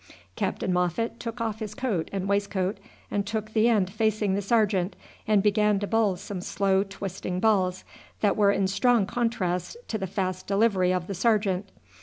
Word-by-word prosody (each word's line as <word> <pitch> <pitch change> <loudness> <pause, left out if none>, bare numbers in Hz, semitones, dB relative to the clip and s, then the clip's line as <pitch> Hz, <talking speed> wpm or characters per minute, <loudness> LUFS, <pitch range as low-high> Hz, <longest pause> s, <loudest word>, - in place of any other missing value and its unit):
Captain 185 - -1
Moffat 180 +7 0
took 230 +1 -5
off 220 -2 -2
his 210 -2 -5
coat 235 -11 -1
and 195 -1 -2
waistcoat 200 0 0 0.3
and 205 - 0
took 215 +1 -4
the 225 +1 +4
end 200 -5 +2
facing 215 -2 +1
the 200 - 0
sergeant, 200 -3 +1 0.3
and 210 -2 +4
began 210 0 +3
to 205 - -2
bowl 215 -2 +2
some 185 +1 -6
slow 195 +1 +1
twisting 195 -2 -4
balls, 185 -4 +2 0.4
that 205 - +3
were 205 -2 +4
in 195 -1 +1
strong 205 +3 +3
contrast 200 - -1
to 220 - -2
the 190 - -3
fast 185 0 -3
delivery 195 -3 +3
of 180 -2 -1
the 195 - -4
sergeant. 200 -1 +1
200 Hz, 175 wpm, -26 LUFS, 190-220 Hz, 0.4 s, the